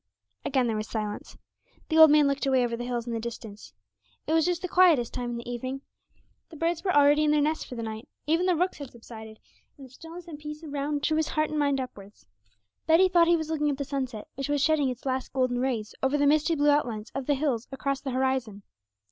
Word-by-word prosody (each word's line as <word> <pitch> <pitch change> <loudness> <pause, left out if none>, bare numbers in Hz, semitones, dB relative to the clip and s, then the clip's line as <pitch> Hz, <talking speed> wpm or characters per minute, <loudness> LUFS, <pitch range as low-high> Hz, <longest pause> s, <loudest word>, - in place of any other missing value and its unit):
Again 260 -2 +1
there 225 -2 -1
was 215 0 -3
silence; 210 -2 -5 0.5
the 320 -1 +3
old 315 -1 +10
man 295 -1 +5
looked 280 0 -1
away 260 -2 +3
over 235 -1 -1
the 240 +1 -5
hills 240 -2 -3
in 240 - -4
the 230 - -2
distance. 220 - -8 0.5
It 315 - -1
was 325 +1 +3
just 355 0 -1
the - - -1
quietest 340 -10 +4
time 245 -1 -3
in 240 - -4
the 235 - -8
evening; 255 +3 -4 0.7
the 330 - -12
birds 335 +2 -1
were 375 - +1
already 290 -1 +5
in 305 - +2
their 300 0 +3
nests 310 +2 0
for 250 - -9
the 230 - -5
night, 220 +1 -6 0.2
even 330 +4 +1
the 365 - +3
rooks 360 +1 -1
had 285 -3 -7
subsided; 220 -2 -12 0.4
and 275 - -11
the 260 - -16
stillness 330 +5 -11
and 305 -3 -9
peace 300 +1 -8
around 290 -1 -3
drew 310 - +1
his 315 - +1
heart 310 0 -1
and 305 - -1
mind 280 -2 +1
upwards. 205 -6 -9 0.6
Betty 340 +4 +5
thought 345 -2 +4
he 340 0 +4
was 315 0 -4
looking 300 -2 0
at 280 - -2
the 280 - -3
sunset, 260 -6 -4
which 275 +1 -5
was 290 0 +1
shedding 310 -4 +2
its 250 0 -7
last 260 -1 -2
golden 255 -2 0
rays 240 -5 -2
over 265 +2 +1
the 285 - +2
misty 305 +3 +3
blue 290 0 +3
outlines 235 -7 -1
of 275 -1 -5
the 290 - +3
hills 260 -5 -1
across 275 0 -2
the 270 - -4
horizon. 255 -5 -1
275 Hz, 240 wpm, -27 LUFS, 245-310 Hz, 0.7 s, old